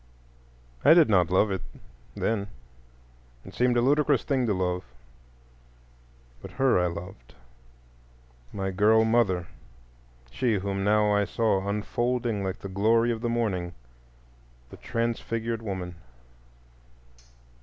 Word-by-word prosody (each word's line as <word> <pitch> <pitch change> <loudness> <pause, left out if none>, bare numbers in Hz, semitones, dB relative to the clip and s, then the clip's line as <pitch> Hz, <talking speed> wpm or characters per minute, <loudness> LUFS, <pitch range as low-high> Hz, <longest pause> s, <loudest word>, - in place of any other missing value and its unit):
I 160 - +7
did 165 -7 +5
not 90 -4 +3
love 95 +3 +2
it 95 - -2 0.5
then; 105 -3 -1 1.0
it - - -11
seemed 125 0 +1
a - - +3
ludicrous 145 0 +2
thing 130 -4 0
to 105 - +1
love; 90 -1 -1 1.6
but - - -9
her 130 -7 +2
I 90 - +1
loved, 85 -7 -9 1.2
my 95 -1 -3
girl 110 +4 +4
mother, 110 -6 +1 0.9
she 115 - 0
whom 100 0 -2
now 105 0 +3
I 105 0 +2
saw 100 -3 0
unfolding 115 +1 -1
like 95 0 -3
the - - -6
glory 115 +5 +2
of 115 -1 -4
the 120 - -1
morning—the - - -7
transfigured 115 0 -3
woman. 95 -5 -5
105 Hz, 115 wpm, -26 LUFS, 90-115 Hz, 1.6 s, I